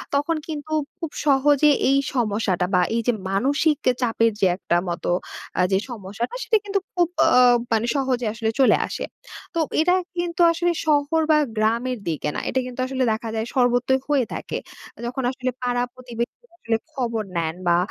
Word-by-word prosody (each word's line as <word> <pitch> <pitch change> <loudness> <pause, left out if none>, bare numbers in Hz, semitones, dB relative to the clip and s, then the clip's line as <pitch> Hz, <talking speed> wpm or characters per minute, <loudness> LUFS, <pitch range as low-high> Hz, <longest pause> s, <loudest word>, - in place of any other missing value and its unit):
তখন 295 +4 +1
কিন্তু 310 0 -6 0.3
খুব 330 -3 -5
সহজে 290 +1 +4 0.2
এই 275 - +4 0.2
সমস্যাটা 205 -6 +1
বা 180 - +5
এই 230 - +1
যে 245 - +4 0.2
মানসিক 285 +9 +2
যে 255 - +5
চাপের 230 -1 +2
যে 190 - +5
একটা 175 - 0
মতো 170 - -3 0.5
আ - - +5
যে 190 - +4
সমস্যাটা, 215 - -5
সেটা 440 - +3
কিন্তু 395 0 0
খুব 350 -2 +2 0.2
অ - - +4 0.4
মানে 225 +1 +2
সহজে 260 -3 0
আসলে 220 0 -1
চলে 265 - +6
আসে। - - -5 0.5
তো 335 - -1 0.2
এটা 355 +2 +3 0.2
কিন্তু 345 0 -1
আসলে, 345 +1 +1
শহর 305 +1 +2
বা 305 - +6 0.2
গ্রামের 230 +3 0
দিকে 150 -1 -2
না। - - -1
এটা 260 - 0
কিন্তু 255 0 -8
আসলে 260 -1 -1
দেখা 220 +1 -3
যায় 220 +1 -1
সর্বত্রই 250 +1 +3
হয়ে 275 -5 +3
থাকে। - - -4 0.5
যখন 255 +2 -3
আসলে 255 -1 -3
পাড়া 245 0 0
প্রতিবেশীরা 250 - -6
আসলে 225 -6 0 0.2
খবর 230 -5 -2
নেন, 160 0 -1
বা 170 0 +5
250 Hz, 175 wpm, -23 LUFS, 225-290 Hz, 0.5 s, চলে